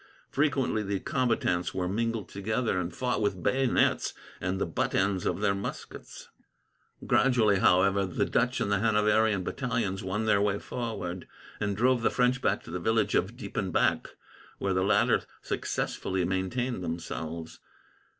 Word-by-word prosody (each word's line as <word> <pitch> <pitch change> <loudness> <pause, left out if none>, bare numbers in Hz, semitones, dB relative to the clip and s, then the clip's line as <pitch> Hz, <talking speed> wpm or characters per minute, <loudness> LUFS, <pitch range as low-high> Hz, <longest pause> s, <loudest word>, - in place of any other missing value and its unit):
Frequently 135 -6 +1
the 100 -1 -2
combatants 115 -8 0
were 90 -1 -1
mingled 115 +1 -1
together, 110 +1 -1
and 90 0 -3
fought 125 +6 -1
with 95 -4 -1
bayonets 130 -1 +2 0.2
and 95 +1 -2
the - - +1
butt 85 - -1
ends 95 -1 +1
of - - -1
their 100 -2 +3
muskets. 100 +1 -7 0.8
Gradually, 115 -7 +3
however, 95 +2 +4
the 90 - 0
Dutch - - +1
and 100 - -1
the 100 - +2
Hanoverian 105 -1 +3
battalions 115 -5 -2
won 100 +4 -2
their 105 -2 +3
way 100 -1 +1
forward, 100 -8 -5 0.3
and 100 -2 -1
drove 125 +1 +3
the 115 - +3
French 125 0 +1
back 100 - 0
to - - -10
the 90 - -3
village 110 +5 +1
of 105 +6 0
Diepenbeck, 100 -5 0 0.5
where 100 -1 -1
the 95 - +1
latter 100 +3 +3 0.2
successfully 95 -1 -2
maintained 95 +5 -2
themselves. 80 -1 -5
100 Hz, 150 wpm, -28 LUFS, 95-115 Hz, 0.8 s, however